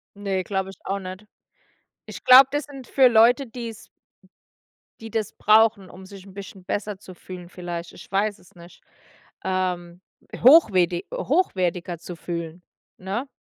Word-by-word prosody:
Ne, 195 -2 -2
glaube 190 0 -3
ich 195 - -12
auch 195 +1 -2
nicht. 185 +2 -9 0.8
Ich - - -10
glaube, 255 +1 +9
das 290 +1 -1
sind 275 -4 -11
für 265 -2 +5
Leute, 240 +4 +4
die 235 0 -7
es 225 - -12 1.1
die 225 -1 -9
das 220 -2 -2
brauchen, 215 -2 +3
um 190 +1 -13
sich 195 0 -13
'n 195 - -14
bisschen 195 -1 -10
besser 205 +1 -3
zu 185 - -12
fühlen 180 -1 -10
vielleicht, 175 -1 -7
ich - - -14
weiß 205 +1 0
es 185 +3 -22
nicht. 170 0 -16 0.6
Ähm, 180 -2 -3 0.4
hochwerti 195 - +5
hochwertiger 180 - -1
zu 175 - -9
fühlen, 170 0 -6 0.3
ne? 200 +8 -4
195 Hz, 150 wpm, -23 LUFS, 180-225 Hz, 1.1 s, glaube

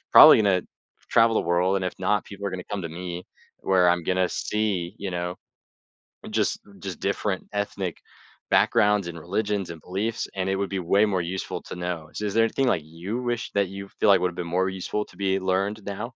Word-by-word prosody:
probably - - +11
gonna 95 -3 +3 0.5
travel 115 0 +5
the - - +2
world, 90 +2 +3
and 95 - -2
if - - -21
not, 105 -1 +2
people 100 0 -10
are - - -4
gonna 90 - -5
come 100 -3 -2
to - - -4
me, 90 - -4 0.6
where 95 -2 +5
I'm 85 -1 0
gonna 90 -1 +2 0.2
see, 105 -1 +1 0.3
you 95 - -2
know, 90 0 -2 1.1
just 105 - +2 0.3
just 90 -4 -4
different 100 -1 -1 0.2
ethnic 95 -3 -4 0.6
backgrounds, 105 -2 +4
and 85 - -7
religions, 100 -1 -1
and 80 - -9
beliefs, 105 +5 -2 0.2
and 95 - 0
it - - +1
would 100 - -1
be 95 -1 -2
way 100 +2 +6
more 90 - +2
useful - - -4
to - - -5
know. 90 -1 -1 0.2
So - - -4
is 100 - -3
there 115 - +5
anything, 135 +3 0
like, 80 - -3 0.2
you 95 +4 -5 0.2
wish 120 - -2
that 100 -2 +3
you 100 - -5 0.2
feel 105 - +4
like 95 -2 +7
would 90 -1 +1
have - - -15
been - - -8
more 95 0 +2
useful 105 +3 -2
to - - -17
be 95 - +2 0.2
learned 100 +3 0 0.2
now? 110 - -3
95 Hz, 215 wpm, -25 LUFS, 90-105 Hz, 1.1 s, probably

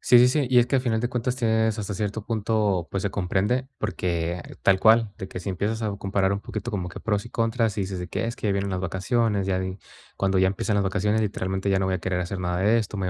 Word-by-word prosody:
Sí, 120 - +6
sí, 125 - +7
sí, 140 0 +1
y 125 - +6
es 120 - +5
que, 135 - +1
al 130 - +1
final 115 -3 0
de 120 - 0
cuentas, 125 +1 -1
tienes 110 -2 +1
hasta 100 -1 -3
cierto 105 +2 -3
punto, 105 -5 0
pues, 95 - -2
se 100 - 0
comprende, 100 +8 0
porque, 85 -1 -2 0.2
tal 95 0 +4
cual, 110 -2 +5
de 95 - -7
que - - -6
si 100 - -6
empiezas 100 +4 -1
a 105 -2 -2
comparar 95 -1 0
un 100 - -2
poquito 110 +3 -5
como 90 -3 -2
que - - -8
pros 105 -1 -1
y 120 - -11
contras, 115 -2 0
y - - +1
dices 95 -1 -4
de 90 - -5
que: - - -2
"Es 115 - -3
que 105 - -1
vienen 100 0 -1
las 95 -1 -2
vacaciones, 100 +2 0
ya 95 -1 +1
en 95 +1 -3 0.4
cuando 95 -1 +1
ya 95 0 +4
empiezan 100 +2 -1
las 100 - +2
vacaciones, 105 +3 +1
literalmente, 95 -1 -2
ya 95 - +3
no 95 - 0
voy 95 - 0
a - - -1
querer 90 0 -1
hacer 90 +2 -3
nada 90 0 -1
de 105 +4 +4
esto, 105 -2 -3
me 95 - -1
voy - - 0
100 Hz, 280 wpm, -25 LUFS, 95-110 Hz, 0.4 s, sí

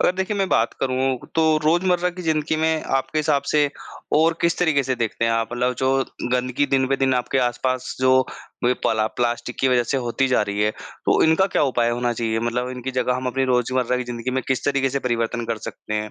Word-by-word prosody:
अगर - - +3
देखिए 190 +2 -1
मैं 195 -1 0
बात 115 +1 +2
करूँ, 130 -1 0 0.2
तो 160 -1 +3
रोज़मर्रा 175 +2 +2
की 180 +1 -8
ज़िंदगी 155 -1 0
में 160 0 +1
आपके 135 +3 -2
हिसाब 150 -2 +1
से 150 -1 +3 0.5
और 165 +1 +3
किस 170 0 +1
तरीक़े 160 -5 +2
से 130 0 -1
देखते 115 -1 -2
हैं, 115 - +2
आप 115 0 0
मतलब 125 +1 0
जो 130 0 +2 0.4
गंदगी 125 +3 +1
दिन-ब-दिन 135 0 +1
आपके 125 +2 0
आस-पास 130 +1 -1
जो 130 0 +5 0.4
ब 125 +1 +3
पला 110 -1 +2
प्लास्टिक 120 0 -1
की 135 - +3
वज़ह 125 -1 +3
से 135 - +1
होती 135 +3 +1
जा 125 - +3
रही 100 0 -3
है, 105 - +2
तो - - -1
इनका 160 +4 +4
क्या - - 0
उपाय 120 -4 +1
होना 120 0 0
चाहिए? 115 -1 -1
मतलब 120 +2 -1
इनकी 130 +1 -5
जगह 125 0 0
हम 130 0 -4
अपनी 135 +1 0
रोज़मर्रा 125 0 +1
की 125 - -3
ज़िन्दगी 120 +1 -4
में 130 0 -1
किस 130 - 0
तरीक़े 135 -1 +1
से 140 - -1
परिवर्तन 120 -2 -1
कर 115 -2 -2
सकते 105 - -7
हैं 105 0 -2
130 Hz, 220 wpm, -22 LUFS, 120-145 Hz, 0.5 s, जो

